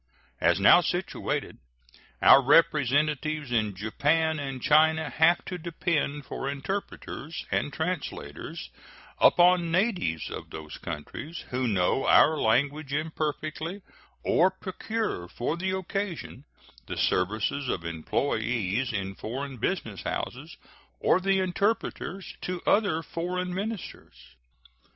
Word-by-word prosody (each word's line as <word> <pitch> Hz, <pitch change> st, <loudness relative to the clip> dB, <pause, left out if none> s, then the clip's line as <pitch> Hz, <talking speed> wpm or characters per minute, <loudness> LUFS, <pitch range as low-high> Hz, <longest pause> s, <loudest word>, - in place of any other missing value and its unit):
As 85 Hz, +2 st, +3 dB
now 100 Hz, -, +7 dB
situated, 175 Hz, +2 st, -2 dB, 0.6 s
our 140 Hz, -, +9 dB
representatives 150 Hz, 0 st, +2 dB
in 110 Hz, -4 st, +1 dB
Japan 155 Hz, -, +1 dB
and 135 Hz, -2 st, -4 dB
China 160 Hz, +3 st, +3 dB
have 170 Hz, +2 st, +3 dB
to 180 Hz, -1 st, -5 dB
depend 155 Hz, -3 st, -1 dB
for 135 Hz, -, -4 dB
interpreters 155 Hz, +1 st, -5 dB
and 145 Hz, -, 0 dB
translators 165 Hz, 0 st, -5 dB, 0.5 s
upon 175 Hz, -1 st, +5 dB
natives 175 Hz, -, 0 dB
of -, -, -7 dB
those 75 Hz, -1 st, -8 dB
countries 145 Hz, -, -7 dB
who 125 Hz, 0 st, 0 dB
know 100 Hz, +4 st, +1 dB
our 160 Hz, -, +6 dB
language 140 Hz, +4 st, +1 dB
imperfectly, 155 Hz, +4 st, -3 dB, 0.4 s
or 180 Hz, +3 st, +4 dB
procure 190 Hz, -, -4 dB
for 120 Hz, -, -2 dB
the 190 Hz, +2 st, -2 dB
occasion 190 Hz, -7 st, -4 dB, 0.4 s
the -, -, -5 dB
services 110 Hz, +8 st, 0 dB
of 85 Hz, -6 st, -2 dB
employees 110 Hz, -, -1 dB
in 100 Hz, -3 st, -3 dB
foreign 130 Hz, +6 st, -5 dB
business -, -, -2 dB
houses -, -, -5 dB, 0.4 s
or 180 Hz, -, +3 dB
the 195 Hz, +1 st, +2 dB
interpreters 190 Hz, 0 st, -1 dB
to 180 Hz, -1 st, -3 dB
other 190 Hz, -6 st, +2 dB
foreign 180 Hz, +2 st, -3 dB
ministers. 180 Hz, -, -6 dB
155 Hz, 110 wpm, -27 LUFS, 125-180 Hz, 0.6 s, our